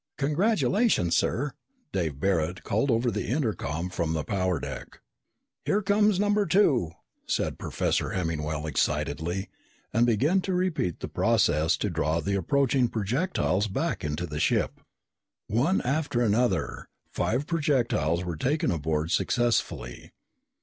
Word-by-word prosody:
"Congratulations, 190 - +2
sir," 140 +4 0 0.4
Dave 80 -7 -2
Barret 90 -1 0
called 110 +7 0
over 120 0 +2
the 105 0 -3
intercom 100 - -1
from 80 -3 -1
the 80 -2 -1
power 95 -2 0
deck. - - -7 0.6
"Here 205 +1 +1
comes 205 0 +3
number 205 0 +2
two," 140 - +3 0.3
said - - -1
Professor - - -1
Hemmingwell 80 -3 -2
excitedly, 85 +4 -1 0.5
and 115 +2 +3
began 145 - +2
to 185 0 -2
repeat 180 - -1
the - - -3
process 80 +2 +2
to 105 - -2
draw 80 0 0
the 100 +4 -2
approaching 130 +6 +2
projectiles 110 - 0
back 95 - -2
into 75 +3 -2
the 75 -2 -5
ship. - - 0 0.6
One 130 - +1
after 140 -2 0
another, 120 +3 0 0.2
five 125 +6 -1
projectiles 120 - +1
were 85 -3 -4
taken 140 - 0
aboard 80 0 -1
successfully. 115 - 0
110 Hz, 130 wpm, -27 LUFS, -, 0.6 s, comes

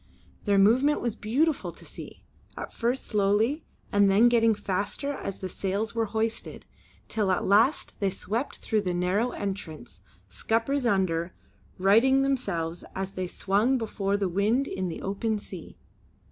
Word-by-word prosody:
Their 200 -2 +3
movement 250 +9 +4
was 235 -3 -2
beautiful 275 +9 0
to - - -11
see; - - -10 0.3
at - - -6
first 240 +3 -1
slowly, 215 +8 +1 0.3
and 205 -1 +4
then 215 +5 +6
getting 230 -2 +4
faster 205 +7 -2
as 195 -7 -5
the 190 - -5
sails 200 +4 -2
were 230 -1 0
hoisted, 220 +2 -3 0.4
till 210 -3 0
at 185 - +1
last 220 +9 +3
they 200 - +1
swept 220 +8 -3
through 220 -2 0
the 180 -3 -2
narrow 185 +7 +1
entrance, 190 -8 -6 0.3
scuppers 240 +4 0
under, 180 -4 0 0.4
righting 230 +8 +4
themselves 180 -12 -1
as 190 0 -3
they 185 -1 -4
swung 205 +9 +1
before 205 -3 -1
the 200 -1 0
wind 210 +9 +1
in 185 -1 -3
the 165 - -6
open 210 +3 -1
sea. 185 -4 -10
205 Hz, 150 wpm, -27 LUFS, 195-235 Hz, 0.4 s, then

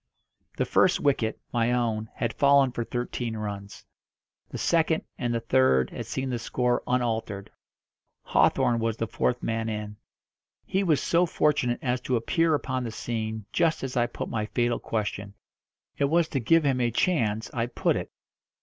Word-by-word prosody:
The - - +1
first - - +3
wicket 120 -6 +1
my 120 0 +2
own 110 -3 0
had 115 -1 -2
fallen 140 -2 +4
for 120 - -3
thirteen 120 -1 -3
runs. 100 -2 -6 0.6
The - - -6
second, 165 -1 +2 0.2
and 120 -4 -1
the 115 - 0
third, 115 - +3
had - - -6
seen 130 -1 -3
the 120 - -2
score 125 +1 0
unaltered. 115 -5 -1 0.7
Hawthorn 120 -1 +3
was 115 -1 -1
the 115 - -1
fourth 120 +2 -1
man 115 0 -1
in. 105 -1 -5 0.7
He 190 - 0
was 160 -6 +3
so 175 +1 +2
fortunate 145 -7 +1
as 125 -1 0
to 130 - -1
appear 160 +7 +2
upon 130 -3 -2
the 120 - -3
scene 110 -1 -4
just 165 -4 +1
as 130 -1 -4
I 120 -1 +2
put - - -5
my 110 -1 -2
fatal 120 +1 0
question 100 -2 -3 0.6
it 140 - +2
was 165 +3 +2
to 135 - -1
give 165 +7 +4
him 130 -2 +2
a 120 - +2
chance 115 - 0
I 115 -1 -1
put - - 0
it. - - -4
120 Hz, 170 wpm, -27 LUFS, 110-135 Hz, 0.7 s, fallen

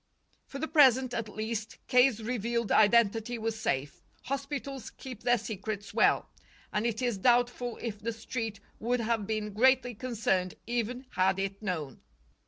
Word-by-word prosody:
For 275 - -7
the 315 +3 -2
present, 260 -5 +5
at 230 -3 -3
least, 220 +1 -4
K.'s 250 -3 +4
revealed 235 -1 -1
identity 225 +2 +4
was 225 0 -3
safe. 140 - -2 0.2
Hospitals 275 -1 -4
keep 255 -5 -10
their 245 0 +3
secrets 205 -1 -5
well. - - +3 0.5
And 210 +3 +1
it 235 +2 -2
is 240 -5 0
doubtful 245 +1 +2
if 215 -3 -5
the 230 +2 -2
Street 225 -2 -4 0.2
would 245 +3 0
have 225 -3 -1
been 215 -1 -2
greatly 250 +2 +4
concerned 210 -6 -1
even 240 +2 -2
had 185 +1 +2
it 195 +1 -3
known. 160 - -4
230 Hz, 150 wpm, -30 LUFS, 210-245 Hz, 0.5 s, present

